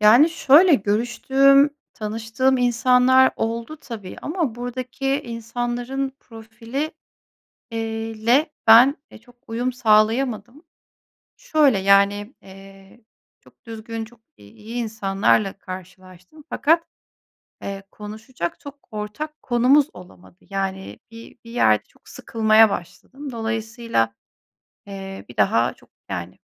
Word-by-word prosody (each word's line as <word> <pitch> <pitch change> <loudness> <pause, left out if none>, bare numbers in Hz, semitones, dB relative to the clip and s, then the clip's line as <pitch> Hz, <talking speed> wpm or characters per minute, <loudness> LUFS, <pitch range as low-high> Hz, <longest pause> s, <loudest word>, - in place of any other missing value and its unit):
Yani, 230 +9 +7
şöyle: 325 +2 +5
Görüştüğüm, 265 +6 +3 0.2
tanıştığım 225 +4 -1
insanlar 250 +2 +4
oldu 230 +6 -3
tabii 225 -10 -9
ama 310 -7 -2
buradaki 255 +2 -5
insanların 240 +3 -4
profili 230 +6 -6 0.8
iii, 225 -1 -5
le 280 +7 +3 0.2
ben 240 +6 +8 0.3
çok 245 +1 -21
uyum 245 +3 -2
sağlayamadım. 240 +4 +1 0.7
Şöyle: 305 - +2
Yani, 200 +3 +3
eee, 195 +2 -16 0.4
çok - - -24
düzgün, 225 0 -6
çok 235 +1 -19 0.2
iyi 210 - -12
insanlarla 210 -3 0
karşılaştım 185 - -12
fakat, 330 +3 +2 0.8
eee, 195 0 -6
konuşacak 215 -2 -7
çok 285 0 -13
ortak 215 +9 -6
konumuz 260 +4 +3
olamadı. 180 0 -15
Yani 195 -1 -4
bir 230 0 -13
bir 230 - -12
yerde 110 - +2
çok - - -25
sıkılmaya 220 -1 +3
başladım. 265 - -7
Dolayısıyla, 225 - -2 0.7
eee, 195 -1 -8
bir 120 - -13
daha 115 +4 +2
çok - - -24 0.2
yani 90 -2 -6
230 Hz, 105 wpm, -22 LUFS, 205-255 Hz, 0.8 s, ben